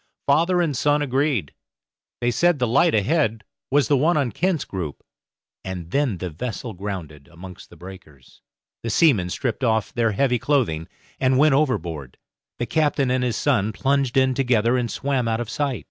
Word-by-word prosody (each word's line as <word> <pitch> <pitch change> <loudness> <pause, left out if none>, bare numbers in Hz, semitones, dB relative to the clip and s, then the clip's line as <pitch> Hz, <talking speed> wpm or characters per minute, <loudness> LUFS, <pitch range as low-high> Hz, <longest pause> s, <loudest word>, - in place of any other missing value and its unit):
Father 170 +5 +3
and 150 -5 -1
son 145 +3 +2
agreed; 135 - 0 0.7
they 120 0 +1
said 175 +7 +2
the 125 - +1
light 140 +8 +3
ahead 115 -1 +1 0.3
was 145 0 +3
the 145 - +3
one 155 +5 +2
on 135 -5 0
Kent's 175 - -1
Group, 85 -7 -6 0.6
and 90 -3 -6
then 140 -7 0
the 90 0 -5
vessel 110 +6 -5
grounded 90 -7 -7
amongst 90 +1 -12
the - - -15
breakers. 85 -8 -14 0.4
The 115 - -4
seamen 110 - +3
stripped 120 +6 -3
off 110 -3 +1
their 115 -3 +1
heavy 125 +2 +1
clothing, 110 - 0 0.3
and 130 0 +2
went 150 +1 +5
overboard; 85 - -1 0.4
the 120 - -2
captain 145 -3 +1
and 130 0 +1
his 120 -3 -1
son 110 -7 +1
plunged 135 +1 0
in 130 0 +3
together 120 -3 +2
and 120 -2 -1
swam 135 -3 -1
out 115 0 0
of 120 -2 -4
sight. 140 -5 -1
125 Hz, 175 wpm, -22 LUFS, 100-140 Hz, 0.7 s, went